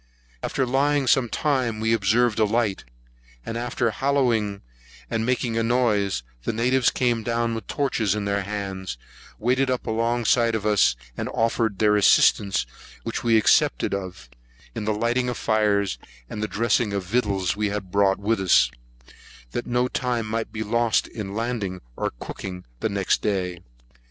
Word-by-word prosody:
After 135 - -1
laying 140 +2 +1
some 125 -1 +3
time, 130 -7 0
we 110 +1 +1
observed 115 +2 +2
a - - +5
light; 110 -2 0 0.6
and 115 - -4
after 120 -1 -1
hallooing 115 -6 0 0.5
and 115 +1 -1
making 120 -2 0
a - - +2
noise, 110 - +1 0.2
the - - -2
natives 125 +2 +2
came 120 -3 0
down 115 +1 -1
with 115 - -6
torches 115 -8 0
in 105 -1 -3
their 100 0 0
hands, 95 -5 -5 0.4
waded 130 +3 +1
up 130 -1 -1
alongside 115 +1 +1
of 105 -1 -3
us, 105 - +4 0.2
and - - -4
offered 115 -2 0
their 105 0 +3
assistance, 100 -1 +4 0.4
which - - -4
we 115 -1 +4
accepted 100 - +3
of, 95 -7 -5 0.5
in 105 - -4
lighting 120 +4 0
fires, 105 -3 +1 0.3
and 105 0 -3
dressing 115 +3 +1
the 100 0 -1
victuals 100 -2 0
we 105 0 0
had 100 -3 -5
brought 100 -1 +3
with 105 +1 0
us, 85 -9 +4 0.8
that 120 - -4
no 125 +1 +1
time 125 -3 -1
might 110 +1 -3
be 110 -1 -3
lost 115 +1 +1
in 100 -3 -6
landing 110 -5 -2 0.2
or - - -2
cooking 90 -1 -7
the - - -1
next 100 -2 0
day. 90 -4 -1
110 Hz, 155 wpm, -24 LUFS, 100-120 Hz, 0.8 s, a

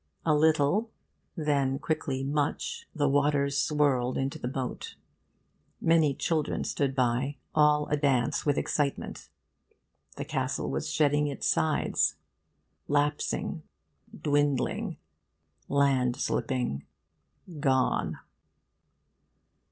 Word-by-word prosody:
A 155 - +4
little, 155 +8 +3 0.5
then 140 -5 +1
quickly 135 -3 -2
much, 150 - -2
the 145 -2 +2
waters 140 0 +2
swirled 140 -4 +1
into 135 +1 -2
the - - -3
moat. 130 0 -4 0.8
Many 160 -4 +3
children 155 +1 -1
stood 135 -2 -1
by, 130 +2 0 0.2
all 150 -1 +4
a 150 - +1
dance 135 -5 +1
with 145 -2 +1
excitement. 145 -2 -2 0.9
The 140 - -4
castle 135 -3 -2
was 155 - -2
shedding 150 -1 +2
its 140 - -4
sides, 155 -1 +1 0.7
lapsing, 145 +1 0 0.5
dwindling, 145 -2 0 0.7
landslipping 130 - 0 0.8
gone. 130 -3 +1
145 Hz, 90 wpm, -28 LUFS, 135-150 Hz, 0.9 s, A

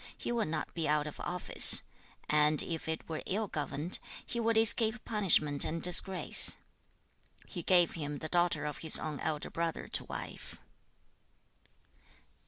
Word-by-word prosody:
he - - -6
would 235 -7 -3
not 155 -1 -6
be 165 -2 -4
out 150 0 -1
of 150 - -10
office, 180 0 +5 0.4
and 150 0 +2
if 165 -2 -7
it 160 - -6
were 160 -1 -7
ill 210 +3 -4
governed, 150 +1 -5 0.3
he 235 - -7
would 230 -1 -1
escape 225 +1 +3
punishment 155 -9 +2
and 165 +1 -6
disgrace. 180 +1 +3 0.9
He 180 - -9
gave 175 0 +2
him 145 -3 -7
the 155 - -8
daughter 175 -2 -1
of 150 -1 -7
his 160 - +9
own 155 -2 -7
elder 155 -2 -5
brother 165 -1 -5
to - - -4
wife. - - -10
165 Hz, 150 wpm, -29 LUFS, 150-190 Hz, 0.9 s, his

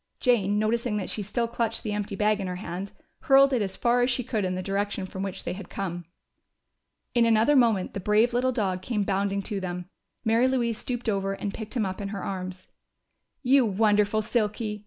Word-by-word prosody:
Jane, 210 -5 +2
noticing 220 +1 0
that 195 - -3
she 215 - -3
still 230 +4 -1
clutched 230 -1 -1
the 215 - -2
empty 210 0 -3
bag 210 +1 +2
in 195 - -3
her 180 - -3
hand, 185 +1 -5 0.3
hurled 275 -2 +5
it 245 - +2
as 190 -2 -2
far 245 +1 +2
as 245 - +3
she 250 0 0
could 220 -3 -1
in 185 0 -1
the 185 - -3
direction 200 0 -2
from 190 0 -7
which 195 -2 -4
they - - -3
had 185 0 -9
come. 175 -3 -4 1.1
In 240 - +4
another 230 +5 +4
moment 230 -7 +3
the - - -3
brave 210 +5 +3
little 255 +2 +2
dog 190 -6 -1
came 210 +1 -1
bounding 200 0 0
to 205 0 -3
them. 180 0 -5 0.3
Mary 230 +3 +4
Louise 240 -4 0
stooped 245 -1 -4
over 195 -2 0
and 200 0 -4
picked 220 +2 -7
him 220 - +1
up 190 +1 -4
in 200 - -3
her 200 -2 -5
arms. 185 -1 -5 0.8
"You 265 +1 +5
wonderful 210 0 +2
Silky!" 210 -1 -1
210 Hz, 210 wpm, -26 LUFS, 195-235 Hz, 1.1 s, hurled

